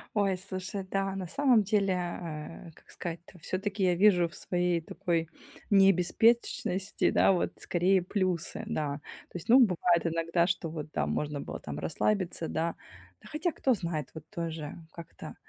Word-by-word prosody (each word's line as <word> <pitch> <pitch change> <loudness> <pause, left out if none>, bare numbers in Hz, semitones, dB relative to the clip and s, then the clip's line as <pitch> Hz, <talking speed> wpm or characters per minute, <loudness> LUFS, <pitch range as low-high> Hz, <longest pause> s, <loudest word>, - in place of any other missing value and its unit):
Ой, 200 -3 +2
слушай, 190 +1 -5
да, 195 0 0
на 190 -1 -4
самом 255 - +3
деле, 200 -1 +2
э, 170 -2 -5
как - - -22
сказать-то, 175 +1 -7
всё-таки 195 +4 -2
я 180 -1 +3
вижу 180 -2 +5
в 165 - -14
своей 175 -1 0
такой 165 0 -2 0.4
не 195 -1 +7
беспечности, 190 0 +1
да, - - +5
вот 180 - +1
скорее 185 +2 +2
плюсы, 180 -2 -2
да. 145 -2 -1 0.3
То - - -6
есть, 165 - -10
ну, 255 +3 +8
бывает 180 -5 +3
иногда, 165 +1 +1
что 175 -2 -1
вот, 155 -1 -5
да, - - 0
можно 150 -1 -2
было - - -6
там 75 -1 -6
расслабиться, 180 - -1
да. 165 +1 -1 0.5
Да, - - -14
хотя 310 +3 -1
кто 260 -1 +2
знает, 170 - -3
вот 160 -1 -9
тоже 165 -3 -5 0.2
как-то. 170 -2 -10
180 Hz, 165 wpm, -30 LUFS, 165-195 Hz, 0.5 s, ну